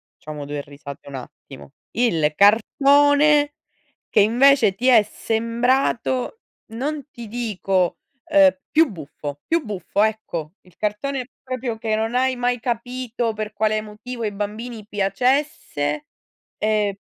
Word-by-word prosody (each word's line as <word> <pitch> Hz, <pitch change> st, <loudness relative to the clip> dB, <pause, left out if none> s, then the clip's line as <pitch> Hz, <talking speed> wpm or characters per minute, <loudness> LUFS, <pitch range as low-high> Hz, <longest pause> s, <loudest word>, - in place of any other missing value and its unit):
facciamo 150 Hz, -2 st, -8 dB
2 145 Hz, 0 st, -4 dB
risate 140 Hz, 0 st, -11 dB
un 140 Hz, -, -7 dB
attimo: 135 Hz, +1 st, -11 dB, 0.2 s
il 165 Hz, -11 st, +1 dB
cartone 285 Hz, +7 st, +4 dB, 0.6 s
che 210 Hz, -, +3 dB
invece 235 Hz, -1 st, +5 dB
ti 245 Hz, +6 st, -3 dB
è 235 Hz, -4 st, +7 dB
sembrato 235 Hz, -, 0 dB, 0.3 s
non 285 Hz, +4 st, -3 dB
ti 235 Hz, -2 st, -9 dB
dico, 195 Hz, -6 st, -1 dB, 0.3 s
ehm, 295 Hz, -3 st, +5 dB
più 315 Hz, -1 st, +4 dB
buffo, 145 Hz, -4 st, -8 dB
più 330 Hz, -1 st, +1 dB
buffo 205 Hz, -2 st, -2 dB
ecco, 210 Hz, -8 st, -2 dB
il 180 Hz, -1 st, -22 dB
cartone 250 Hz, +5 st, -2 dB, 0.2 s
proprio 255 Hz, -3 st, -4 dB
che 220 Hz, -1 st, -2 dB
non 225 Hz, +2 st, -2 dB
hai 260 Hz, +1 st, +2 dB
mai 245 Hz, -1 st, 0 dB
capito 240 Hz, -1 st, -2 dB
per 215 Hz, 0 st, -4 dB
quale 215 Hz, 0 st, 0 dB
motivo 230 Hz, +3 st, -8 dB
ai 210 Hz, -2 st, -1 dB
bambini 215 Hz, +2 st, -5 dB
piacesse? 200 Hz, -, 0 dB, 0.5 s
Ehm, 210 Hz, -2 st, +1 dB
225 Hz, 125 wpm, -22 LUFS, 200-255 Hz, 0.6 s, è